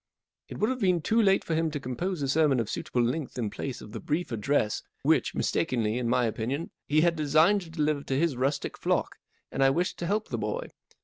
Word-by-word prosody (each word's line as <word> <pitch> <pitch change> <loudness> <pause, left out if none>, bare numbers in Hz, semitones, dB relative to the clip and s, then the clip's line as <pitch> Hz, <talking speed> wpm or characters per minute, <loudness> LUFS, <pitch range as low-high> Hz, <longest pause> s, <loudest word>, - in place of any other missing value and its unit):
It - - -7
would 215 +4 +1
have 260 - -3
been 180 -6 +2
too 230 +1 +3
late 195 -2 +4
for 165 - -2
him 160 0 +1
to 150 -1 -4
compose 145 +6 -3
a - - 0
sermon 145 -2 +3
of 110 -1 -2
suitable 120 - -1
length 130 +3 -2
in 110 -4 -2
place 130 +4 -5
of 105 - -10
the 110 - -5
brief 155 - -2
address 110 0 0 0.2
which—mistakenly, 115 -2 +1
in 120 -2 -1
my 120 0 +3
opinion—he 140 +6 -1
had 170 0 +3
designed 155 +6 +4
to 170 - -10
deliver 155 -3 0
to 135 - -1
his 160 -2 +1
rustic 135 +4 -1
flock, - - 0 0.3
and 135 - +1
I 135 - +6
wished 175 +6 -1
to 170 - -2
help 210 +3 -1
the - - -2
boy. - - -3
150 Hz, 220 wpm, -28 LUFS, 125-170 Hz, 0.3 s, I